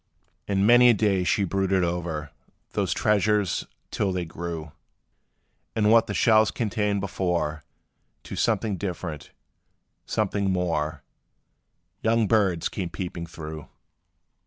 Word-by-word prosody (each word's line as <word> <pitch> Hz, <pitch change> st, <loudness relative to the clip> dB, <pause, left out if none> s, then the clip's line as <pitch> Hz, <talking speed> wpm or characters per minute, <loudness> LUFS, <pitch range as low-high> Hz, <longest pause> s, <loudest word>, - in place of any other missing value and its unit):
And 100 Hz, -1 st, +2 dB
many 120 Hz, +2 st, +7 dB
a 120 Hz, -, +5 dB
day 100 Hz, -3 st, +2 dB
she 100 Hz, +3 st, +1 dB
brooded 95 Hz, 0 st, +1 dB
o'er 85 Hz, -4 st, -3 dB, 0.4 s
Those -, -, -1 dB
treasures, 105 Hz, -2 st, +1 dB, 0.2 s
till 100 Hz, -, 0 dB
they 90 Hz, -1 st, -2 dB
grew, 80 Hz, -2 st, -6 dB, 1.0 s
In 105 Hz, -2 st, +3 dB
what 115 Hz, 0 st, +5 dB
the 100 Hz, -, -3 dB
shells 110 Hz, -2 st, +4 dB
contained 105 Hz, -3 st, -1 dB
before, 85 Hz, -6 st, -2 dB, 0.6 s
To -, -, -7 dB
something 105 Hz, -4 st, 0 dB
different 85 Hz, -5 st, -5 dB, 0.8 s
something 100 Hz, -2 st, 0 dB
more 80 Hz, -5 st, -1 dB, 1.0 s
Young 115 Hz, 0 st, +2 dB
birds 95 Hz, -7 st, +2 dB
came 90 Hz, -4 st, -4 dB
peeping 85 Hz, -2 st, -5 dB
through! 80 Hz, -2 st, -8 dB
95 Hz, 115 wpm, -25 LUFS, 85-105 Hz, 1.0 s, many